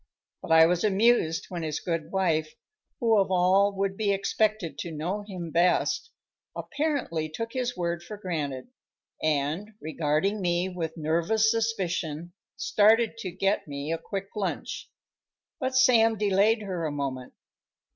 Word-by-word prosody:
But - - -6
I 160 0 +8
was 175 +1 +1
amused 205 -5 +3
when 175 -2 -4
his 155 -2 -2
good 165 -2 -3
wife, 160 -5 0 0.4
who 225 -3 +4
of 195 - +1
all 190 +2 +4
would 195 0 -1
be 205 0 0
expected 200 -5 0
to 170 - -4
know 170 +7 -3
him 185 -5 -7
best, 180 - +2 0.5
apparently 280 - -2
took 230 +9 -5
his 250 -3 -2
word 170 -1 -2
for 210 +4 -8
granted, 155 - -4 0.5
and, 155 +8 -1
regarding 160 +6 -1
me 175 +1 0
with 170 -3 -5
nervous 170 +8 +2
suspicion, 180 -8 -2 0.2
started 220 +2 +3
to 195 - -4
get 195 +2 0
me 140 +1 -4
a 165 - -3
quick 195 -1 -5
lunch. 205 -2 -4 0.7
But 260 -2 -2
Sam 230 -3 +5
delayed 210 +2 +2
her 180 -5 -3
a - - -3
moment. 135 -3 -4
185 Hz, 145 wpm, -27 LUFS, 160-215 Hz, 0.7 s, I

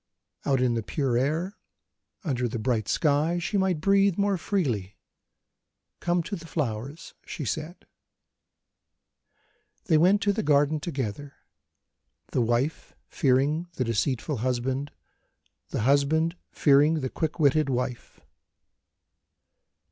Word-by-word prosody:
Out 135 -2 +2
in 125 -2 +2
the 115 - -1
pure 130 +2 -1
air, 155 - -1 0.7
under 125 -7 -1
the 120 - -4
bright 110 -1 -1
sky, 155 +3 +2
she 175 +4 -3
might 190 -4 +1
breathe 195 +1 +3
more 200 -1 +2
freely. 125 - -2 1.0
"Come 175 -1 0
to 200 - -4
the 165 -2 -10
flowers," 140 +1 -4
she 150 - -6
said. 155 - -4 2.0
They 160 -3 +4
went 190 +5 +5
to 205 - +2
the 220 - -1
garden 145 +1 +3
together 140 -2 -5 1.0
the 125 - +1
wife 120 +6 -1
fearing 145 +5 +1
the 130 - 0
deceitful 125 +4 -1
husband, 130 +4 -1 0.8
the - - -2
husband 145 +6 +2
fearing 150 +2 +4
the 130 - -2
quick 160 +1 -3
witted 150 0 +3
wife. 125 -1 -3
145 Hz, 115 wpm, -26 LUFS, 125-165 Hz, 2.0 s, went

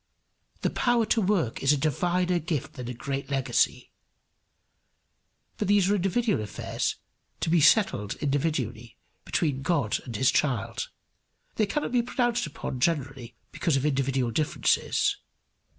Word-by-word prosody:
The - - 0
power 240 -2 +2
to 225 +1 +2
work 185 - 0
is 135 - +4
a 145 - +3
diviner 175 +5 +1
gift 160 -4 -3
than 125 -2 -7
a 125 - -4
great 140 +3 -4
legacy. 135 -3 0 1.7
But 210 - -1
these 200 -1 +4
are - - +4
individual 200 - +1
affairs 105 - -3 0.5
to 160 - 0
be 170 -2 +4
settled 150 - +3
individually 135 -6 -2 0.3
between 140 -5 0
God 145 -8 0
and 120 -3 -7
his 130 +5 +3
child. 125 -10 -1 0.7
They 215 - +2
cannot 295 +6 -2
be 245 -1 +3
pronounced 240 -3 0
upon 135 -3 -5
generally 135 -5 -1 0.2
because 160 -6 0
of 135 - -1
individual 135 -3 0
differences. 150 +5 +1
150 Hz, 135 wpm, -27 LUFS, 130-185 Hz, 1.7 s, is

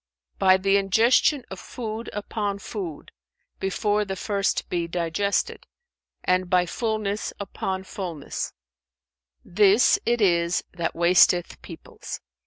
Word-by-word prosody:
"By 185 0 +5
the 195 +1 +2
ingestion 230 +8 +3
of 190 - -6
food 225 -1 -6
upon 205 -1 -3
food, 190 -7 -7 0.5
before 205 +2 0
the 195 -1 -4
first 200 +1 -1
be 170 -1 -2
digested, 180 +3 -1 0.6
and 185 0 +1
by 180 -1 +3
fullness 215 +1 -2
upon 190 -1 -4
fullness; 180 -7 -5 0.9
this 205 +4 +4
it 240 0 +1
is 170 -4 +2
that 170 -2 -3
wasteth 175 0 +3
peoples. - - -9
195 Hz, 110 wpm, -24 LUFS, 180-210 Hz, 0.9 s, By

